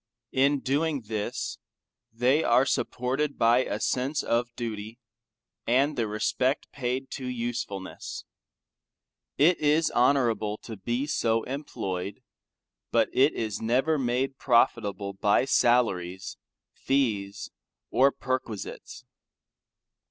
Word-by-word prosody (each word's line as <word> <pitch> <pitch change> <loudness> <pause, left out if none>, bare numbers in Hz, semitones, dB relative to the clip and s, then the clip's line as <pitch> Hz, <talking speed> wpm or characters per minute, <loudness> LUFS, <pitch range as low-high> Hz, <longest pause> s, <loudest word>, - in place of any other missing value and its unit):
In 140 +1 +2
doing 145 +2 0
this, 110 -1 -4 0.5
they 125 +7 +2
are 125 +3 +4
supported 135 +3 -1
by 115 +2 +4
a 105 -5 -2
sense 130 +6 0
of 120 +1 0
duty, 110 -1 -5 0.7
and 140 +5 +3
the 115 -2 0
respect 125 +6 0
paid 130 0 -3
to 130 - -5
usefulness. 120 -6 -5 1.1
It 165 +5 +4
is 155 +2 +2
honorable 120 -5 +2
to 115 - -7
be 120 +7 -2
so 115 -6 +1
employed, 100 -9 -5 0.7
but - - +2
it 135 +4 +4
was 110 -2 -3
[FN9] - - -13
never 130 +8 +2
made 130 +1 -1
profitable 105 -5 +2
by 100 +5 +2
salaries, 95 -9 +1 0.4
fees, 105 -7 -1 0.4
or 135 +2 +5
perquisites. 130 -7 -5
120 Hz, 105 wpm, -27 LUFS, 110-135 Hz, 1.1 s, or